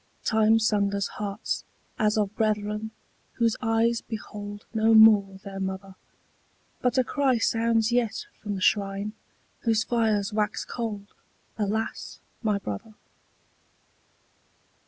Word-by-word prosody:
Time 220 Hz, 0 st, +4 dB
sunders 200 Hz, -3 st, +1 dB
hearts 205 Hz, +1 st, -3 dB, 0.4 s
as 215 Hz, -1 st, +2 dB
of 210 Hz, -1 st, 0 dB
brethren 210 Hz, 0 st, -1 dB, 0.4 s
whose 230 Hz, -2 st, +1 dB
eyes 230 Hz, 0 st, +2 dB
behold 205 Hz, -2 st, -7 dB
No 220 Hz, 0 st, +4 dB
more 210 Hz, -3 st, +7 dB
their 195 Hz, -1 st, -7 dB
mother: 190 Hz, 0 st, -4 dB, 0.9 s
But 250 Hz, 0 st, +1 dB
a 255 Hz, -, +5 dB
cry 265 Hz, 0 st, +1 dB
sounds 225 Hz, 0 st, +2 dB
yet 240 Hz, -3 st, 0 dB, 0.2 s
from 205 Hz, -1 st, -3 dB
the 190 Hz, -, -5 dB
shrine 200 Hz, +1 st, +1 dB, 0.5 s
whose 225 Hz, -2 st, +1 dB
fires 220 Hz, -4 st, +1 dB
wax 210 Hz, 0 st, -1 dB
cold, 210 Hz, -4 st, -5 dB, 0.5 s
Alas 215 Hz, +2 st, -2 dB, 0.2 s
my 215 Hz, -4 st, +1 dB
brother! 195 Hz, -, -6 dB
215 Hz, 115 wpm, -26 LUFS, 205-225 Hz, 0.9 s, more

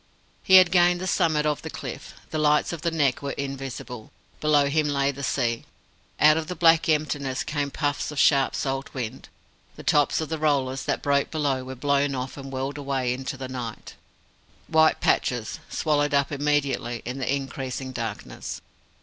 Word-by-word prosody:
He 190 Hz, -, +5 dB
had 185 Hz, -2 st, +8 dB
gained 175 Hz, -1 st, +4 dB
the 185 Hz, -, -4 dB
summit 155 Hz, -4 st, +1 dB
of 150 Hz, -1 st, 0 dB
the -, -, -6 dB
cliff. -, -, -7 dB, 0.2 s
The 155 Hz, -, -1 dB
lights 150 Hz, +2 st, +2 dB
of 165 Hz, -, -6 dB
the 170 Hz, -, +1 dB
Neck 145 Hz, -6 st, +1 dB
were 140 Hz, -1 st, -3 dB
invisible. 135 Hz, -4 st, -6 dB, 0.3 s
Below 150 Hz, -2 st, +3 dB
him 150 Hz, +1 st, +1 dB
lay 140 Hz, -1 st, +1 dB
the 140 Hz, 0 st, -9 dB
sea. 120 Hz, -4 st, -1 dB, 0.5 s
Out 155 Hz, +1 st, +6 dB
of 160 Hz, -1 st, -3 dB
the 180 Hz, -, -4 dB
black 165 Hz, -1 st, +4 dB
emptiness 145 Hz, -4 st, 0 dB
came 145 Hz, -2 st, -2 dB
puffs 145 Hz, 0 st, -2 dB
of 150 Hz, -, -7 dB
sharp 140 Hz, -2 st, +4 dB
salt 135 Hz, 0 st, -3 dB
wind. 125 Hz, -1 st, -5 dB, 0.5 s
The -, -, -10 dB
tops 145 Hz, -1 st, +3 dB
of 160 Hz, -, -3 dB
the 160 Hz, -1 st, -3 dB
rollers 135 Hz, -4 st, 0 dB
that -, -, -1 dB
broke 140 Hz, -1 st, +2 dB
below 140 Hz, -5 st, -1 dB
were 130 Hz, +1 st, -7 dB
blown 140 Hz, +1 st, +1 dB
off 130 Hz, 0 st, -4 dB
and 135 Hz, -1 st, -8 dB
whirled 135 Hz, +2 st, -3 dB
away 135 Hz, -3 st, -1 dB
into 135 Hz, +2 st, -5 dB
the 130 Hz, -1 st, -5 dB
night 125 Hz, -3 st, -6 dB, 0.7 s
white 160 Hz, 0 st, +4 dB
patches, 120 Hz, +4 st, 0 dB
swallowed 145 Hz, -2 st, +1 dB
up 140 Hz, +1 st, +2 dB
immediately 140 Hz, -5 st, -1 dB
in 125 Hz, +3 st, -4 dB
the 130 Hz, -, -1 dB
increasing 135 Hz, -1 st, -4 dB
darkness. 115 Hz, -4 st, -5 dB
140 Hz, 180 wpm, -25 LUFS, 130-150 Hz, 0.7 s, had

